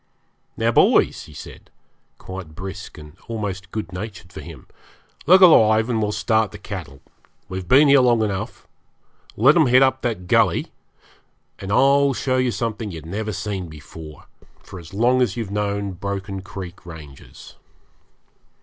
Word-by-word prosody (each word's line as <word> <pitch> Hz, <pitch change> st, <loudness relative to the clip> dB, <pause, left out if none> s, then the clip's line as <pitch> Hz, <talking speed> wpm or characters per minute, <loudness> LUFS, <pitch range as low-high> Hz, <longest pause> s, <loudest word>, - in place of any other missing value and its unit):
'Now, -, -, +1 dB
boys,' -, -, +3 dB
he 75 Hz, -, -15 dB
said, -, -, -11 dB, 0.5 s
quite 95 Hz, -4 st, -9 dB
brisk 95 Hz, +3 st, -8 dB
and 75 Hz, -1 st, -12 dB
almost 100 Hz, -4 st, -5 dB
good 105 Hz, -3 st, -6 dB
natured 95 Hz, -1 st, -8 dB
for -, -, -8 dB
him, -, -, -11 dB, 0.6 s
'look 185 Hz, +4 st, +7 dB
alive 110 Hz, -, +6 dB
and 110 Hz, -2 st, 0 dB
we'll 105 Hz, -1 st, 0 dB
start 110 Hz, 0 st, +1 dB
the 105 Hz, -, -9 dB
cattle; 85 Hz, -10 st, -8 dB, 0.5 s
we've 95 Hz, -1 st, -6 dB
been 140 Hz, +9 st, +6 dB
long 125 Hz, -5 st, +4 dB
enough 100 Hz, -3 st, -4 dB, 0.7 s
here; 110 Hz, -, -6 dB
let 140 Hz, +4 st, +7 dB
'em 160 Hz, -5 st, +4 dB
head 125 Hz, +2 st, +6 dB
up 130 Hz, 0 st, +1 dB
that 110 Hz, -7 st, -3 dB
gully, -, -, +2 dB, 0.9 s
and 95 Hz, 0 st, -6 dB
I'll 140 Hz, +4 st, +4 dB
show 130 Hz, 0 st, 0 dB
you 130 Hz, -1 st, +1 dB
something 110 Hz, 0 st, -3 dB
you've 80 Hz, -4 st, -9 dB
never 105 Hz, +5 st, -4 dB
seen 95 Hz, -2 st, -4 dB
before 75 Hz, 0 st, -12 dB, 0.4 s
for 95 Hz, -2 st, -10 dB
as 85 Hz, -1 st, -13 dB
long 120 Hz, +5 st, +2 dB
as 125 Hz, -1 st, 0 dB
you've 110 Hz, -4 st, -4 dB
known 100 Hz, -1 st, -2 dB
Broken 100 Hz, +1 st, -5 dB
Creek 95 Hz, -1 st, -9 dB
Ranges.' 75 Hz, -7 st, -13 dB
100 Hz, 155 wpm, -21 LUFS, 95-115 Hz, 0.9 s, look